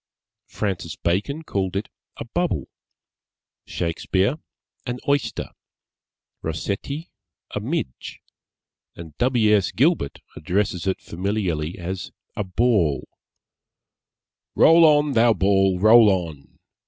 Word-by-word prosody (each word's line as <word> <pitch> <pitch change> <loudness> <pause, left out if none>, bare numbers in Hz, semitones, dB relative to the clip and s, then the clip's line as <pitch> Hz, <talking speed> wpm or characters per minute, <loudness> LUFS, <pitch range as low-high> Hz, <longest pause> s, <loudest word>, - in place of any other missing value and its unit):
Francis 95 -6 -3
Bacon 105 - -1
called 95 - -2
it 100 +3 -2 0.3
a - - -6
Bubble; - - -2 1.0
Shakespeare, 95 - -1 0.5
an 125 0 -2
Oyster; 140 -1 -1 0.9
Rossetti, 100 - -4 0.4
a - - -3
Midge; 65 - -4 0.8
and 80 -3 -11
W. 120 -4 +3
S. 100 -3 +1
Gilbert 140 - +1
addresses 90 +1 -1
it 95 - 0
familiarly 90 -4 -2
as 90 0 -5 0.2
a 105 - -1
Ball 95 - +1 1.5
_Roll 165 +1 +7
on, 150 -1 +4
thou 115 -2 +4
ball, 95 -1 +2
roll 110 +2 +7
on! 85 -7 -3
100 Hz, 100 wpm, -23 LUFS, 85-120 Hz, 1.5 s, Roll